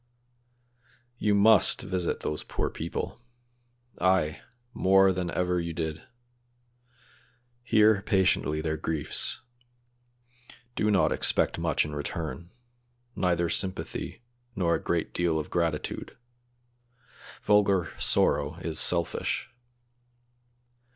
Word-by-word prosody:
"You 105 -1 +2
must 105 +1 +5
visit 90 -3 -2
those 75 - -3
poor - - -3
people; - - -5 0.8
ay, 90 -4 +1 0.3
more 95 0 +4
than 90 -1 -3
ever 90 0 0
you 85 -1 -4
did; 80 -1 -4 1.6
hear 110 -3 +4
patiently 95 -7 +1
their 80 0 -2
griefs; 80 -1 -1 1.3
do 105 - +1
not 100 -3 +3
expect - - +1
much - - +1
in 75 - -7
return, 80 +3 -5 0.7
neither 85 -1 +1
sympathy 95 +6 -3 0.3
nor 85 -5 +1
a - - -1
great - - -2
deal 85 -2 0
of 80 - -5
gratitude; 85 -3 -2 1.3
vulgar 100 -4 +3
sorrow - - +2
is 80 -1 -3
selfish. 85 -1 +1
90 Hz, 95 wpm, -27 LUFS, 80-95 Hz, 1.6 s, must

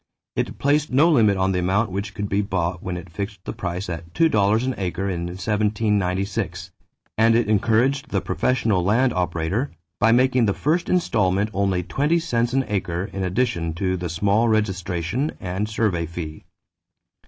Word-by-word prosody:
It - - -2
placed 145 +1 +1
no 150 +7 +5
limit 110 -9 +4
on 95 0 +1
the 90 - 0
amount 95 +4 +1
which 100 +2 -4
could 105 -1 -3
be 100 +1 +1
bought 90 -3 -2
when 90 -1 -4
it 85 - -8
fixed 100 +2 -6
the - - -4
price 90 +1 -4
at 85 -1 -7
$2 110 -8 +3
an 130 - 0
acre 95 +1 -2
in 85 -2 -2
1796, 100 -3 -1 0.5
and 115 0 +5
it 115 -2 +2
encouraged 120 +7 +2
the - - +1
professional 110 -8 0
land 115 +7 +2
operator 90 - -1 0.3
by 115 - +4
making 125 -1 +3
the 100 - +1
first 165 +4 0
installment 105 - +1
only 95 -2 0
twenty 150 - +1
cents 120 -8 0
an 135 +1 +1
acre 95 -2 -2
in 95 - -4
addition 95 -4 0
to 95 +1 0
the 90 -1 -4
small 100 +7 +2
registration 100 - -1
and 95 +4 -3
survey 100 -7 0
fee. 80 -2 -7
100 Hz, 165 wpm, -23 LUFS, 90-115 Hz, 0.5 s, no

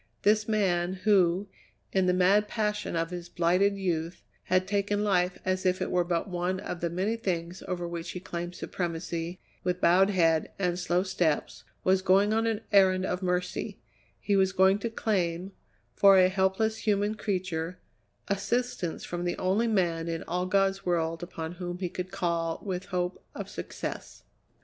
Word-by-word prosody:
This 210 +1 +3
man 185 -5 +1
who, 195 -2 +3 0.5
in 190 -1 +3
the - - +5
mad 195 +3 +4
passion 210 -4 -2
of 165 +1 -1
his 175 -1 -6
blighted 180 +4 +2
youth, 170 -3 -2 0.2
had 185 +1 +2
taken 205 +1 0
life 180 -3 +2
as 185 0 0
if 185 0 +2
it - - -2
were 180 -1 +3
but 170 +1 -1
one 180 0 -1
of 180 - -5
the 170 - 0
many 190 +6 -1
things 180 -5 -3
over 175 -2 -3
which 170 0 -5
he 180 - -5
claimed 175 -1 -5
supremacy, 170 0 -4 0.2
with 180 0 -1
bowed 185 +3 +5
head 165 -5 +2
and 180 -2 0
slow 180 0 +1
steps, 175 -5 -1 0.2
was 190 0 +3
going 195 +3 +4
on 225 +1 +2
an 225 -1 -1
errand 190 -2 +5
of 180 0 -2
mercy; 180 -1 -2 0.4
he 205 - 0
was 190 -1 +3
going 190 +2 +4
to 230 - -2
claim, 185 -5 -1 0.4
for 195 -1 +6
a 185 0 +6
helpless 190 +4 +1
human 205 -1 +1
creature, 185 -5 -3 0.5
assistance 200 -2 -1
from 175 0 -4
the 175 - -1
only 195 +6 +1
man 170 -6 +1
in 165 -1 -3
all 180 +2 -2
God's 195 0 +2
world 165 -2 0
upon 165 -2 -5
whom 175 0 -5
he 180 -1 -3
could 180 +1 -5
call 170 -3 -1
with 185 -1 -3
hope 180 -1 -3
of - - -5
success. - - -6
185 Hz, 170 wpm, -28 LUFS, 175-195 Hz, 0.5 s, for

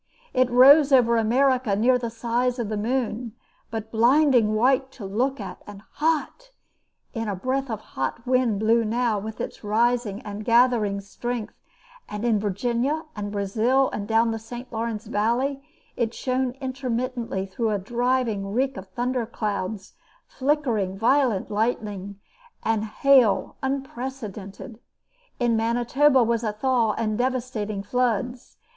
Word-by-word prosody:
It 255 -1 +3
rose 275 +4 +7
over 240 -3 +5
America 245 0 +2
near 250 +4 +3
the 235 -1 -3
size 240 +2 -1
of 235 -4 -3
the 215 - -2
moon, 235 0 -2 0.4
but 220 0 -5
blinding 240 -1 +4
white 260 +4 +2
to 215 - -9
look 250 +8 -1
at, - - -7
and 205 0 -10
hot; 325 +11 -1 0.6
and 225 -2 -3
a 200 - -2
breath 260 +6 -2
of 220 -2 -4
hot 135 - -4
wind 250 -5 +2
blew 225 +2 +3
now 225 -1 0
with 215 +2 -7
its - - -6
rising 220 0 +1
and 210 0 -6
gathering 230 -4 +3
strength, 230 +3 -5 0.6
and 210 +2 -4
in 225 -3 +2
Virginia, 240 - -1
and 205 -1 -4
Brazil, 225 +7 +1
and 205 -1 -4
down 225 +1 +3
the 225 - -3
St. 240 +3 -9
Lawrence 225 0 -3
valley, 240 +6 0 0.3
it 235 -1 -1
shone 255 -1 -1
intermittently 255 -5 -3
through 220 +4 -2
a 210 - +1
driving 235 -1 -1
reek 260 +1 0
of 190 0 -8
thunder 245 +4 -2
clouds, 205 -3 -4 0.3
flickering 255 -9 -1
violet 230 -3 +2
lightning, 205 -3 -2 0.4
and 220 -1 0
hail 250 0 +3
unprecedented. 250 -5 -5 0.6
In 240 -2 +2
Manitoba 245 +4 +3
was 230 0 0
a 215 -2 -1
thaw 230 -1 +1
and 215 -1 -2
devastating 240 -5 -2
floods. 245 +1 -2
235 Hz, 140 wpm, -24 LUFS, 215-255 Hz, 0.6 s, rose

